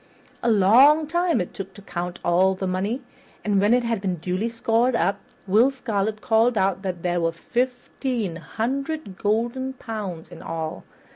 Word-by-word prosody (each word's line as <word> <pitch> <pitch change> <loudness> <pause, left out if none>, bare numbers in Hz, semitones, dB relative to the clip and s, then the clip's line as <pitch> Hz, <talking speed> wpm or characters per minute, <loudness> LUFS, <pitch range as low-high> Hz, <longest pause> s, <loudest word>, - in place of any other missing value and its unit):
A 235 - +1
long 245 +10 +6
time 345 +2 +1
it 180 - -3
took 195 0 -7
to 205 - -11
count 180 -1 -5
all 185 +2 +3
the 190 - -4
money, 195 +8 -1 0.4
and 205 -2 +2
when 205 +2 +3
it 245 0 +4
had 230 -4 -1
been 190 -3 -1
duly 185 +7 -2
scored 230 +2 +1
up, 200 -3 +1 0.3
Will 215 +7 +5
Scarlet 215 -5 -2
called 230 0 +3
out 190 -1 +1
that 185 -3 -4
there 175 -1 0
were 165 0 +1
fifteen 245 -1 -2
hundred 260 - -3
golden 240 +5 0
pounds 210 -9 -6
in 165 - -10
all. 160 +1 -5
210 Hz, 165 wpm, -24 LUFS, 185-245 Hz, 0.4 s, long